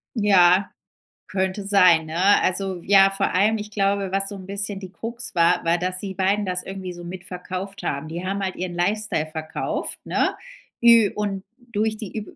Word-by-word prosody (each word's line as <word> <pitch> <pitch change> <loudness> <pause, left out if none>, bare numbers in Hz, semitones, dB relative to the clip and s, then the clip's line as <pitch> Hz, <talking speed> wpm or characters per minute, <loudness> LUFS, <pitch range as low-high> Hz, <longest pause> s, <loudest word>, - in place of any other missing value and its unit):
Ja, 195 -3 +4 0.6
könnte 190 +1 -2
sein, 180 -5 +5
ne? 180 +6 +3
Also 185 -1 -1
ja, 195 0 +5
vor 195 0 -1
allem, 210 +4 +3
ich 210 0 -7
glaube, 200 -2 0
was 195 0 0
so 205 - -7
'n 190 -1 -10
bisschen 200 +1 -2
die 190 -2 -9
Krux 235 +3 -5
war, 170 +1 +3
war 170 +1 +2
dass 185 +1 -2
die 195 -1 -5
beiden 200 +2 +1
das 180 -1 -2
irgendwie 190 -2 -6
so 175 0 -10
mit 175 +1 -8
verkauft 185 +2 -6
haben. 140 +2 -3
Die 170 +3 -6
haben 200 +1 -2
halt 190 -1 -3
ihren 180 0 -4
Lifestyle 180 -2 0
verkauft, 155 0 -3
ne, - - 0 0.5
ü 230 -3 +6
und 200 -2 -3 0.3
durch 215 0 -1
die 215 -1 -7
üb 210 - -7
195 Hz, 190 wpm, -23 LUFS, 180-205 Hz, 0.6 s, ü